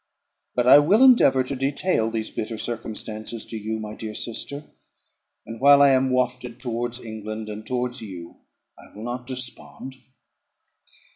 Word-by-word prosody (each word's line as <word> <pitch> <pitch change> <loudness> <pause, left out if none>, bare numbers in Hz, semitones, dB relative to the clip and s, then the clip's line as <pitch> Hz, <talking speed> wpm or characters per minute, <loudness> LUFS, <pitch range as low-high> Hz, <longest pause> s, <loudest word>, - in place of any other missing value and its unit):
But 125 - +1
I 130 +3 +9
will 195 - +4
endeavour 235 - +6
to 135 +2 -4
detail 135 -2 0
these 110 -1 -4
bitter 110 +1 -4
circumstances 110 -1 -5
to - - -8
you, 110 +1 -3
my 105 -1 -6
dear 110 -1 -7
sister; 140 +5 -4 0.8
and, 115 +2 -9
while 140 +1 +7
I 140 - +7
am 130 0 +3
wafted 125 -1 -1
towards 120 0 -3
England, 110 -1 -7
and 105 +1 -8
towards 125 0 -2
you, 90 -6 -9 0.4
I - - -16
will 105 - -8
not 120 +1 -5
despond. 130 +1 -6
120 Hz, 150 wpm, -24 LUFS, 110-130 Hz, 0.8 s, I